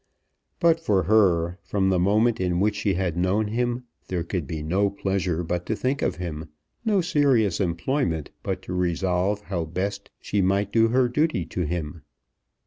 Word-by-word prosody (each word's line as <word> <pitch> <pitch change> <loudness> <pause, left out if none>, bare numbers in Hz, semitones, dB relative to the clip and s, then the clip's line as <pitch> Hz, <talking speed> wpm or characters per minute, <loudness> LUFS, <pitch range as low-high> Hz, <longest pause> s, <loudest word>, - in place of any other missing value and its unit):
But 165 -1 +4
for 100 - +1
her, 90 -3 +3
from 95 0 0
the 95 -1 +2
moment 110 +5 +3
in 90 -1 0
which 105 +2 +2
she 100 -2 0
had 90 -3 -1
known 95 +5 +1
him, 120 +2 -1 0.2
there 90 -2 -2
could 85 -4 -3
be 80 0 -4
no 95 +6 +1
pleasure 95 -4 -1
but 85 +1 -2
to 110 - 0
think 130 +5 -1
of - - 0
him, 80 -3 -6 0.3
no 210 -4 +2
serious 140 - +2
employment 85 - -1
but 95 -1 -3
to 90 - -6
resolve 90 +3 0
how 95 -5 -3
best 100 +5 -4
she 100 - -1
might 100 +2 +1
do 115 -1 +4
her 125 +2 +3
duty 125 - 0
to 90 -2 -3
him. 80 -1 -4
95 Hz, 175 wpm, -25 LUFS, 90-110 Hz, 0.3 s, But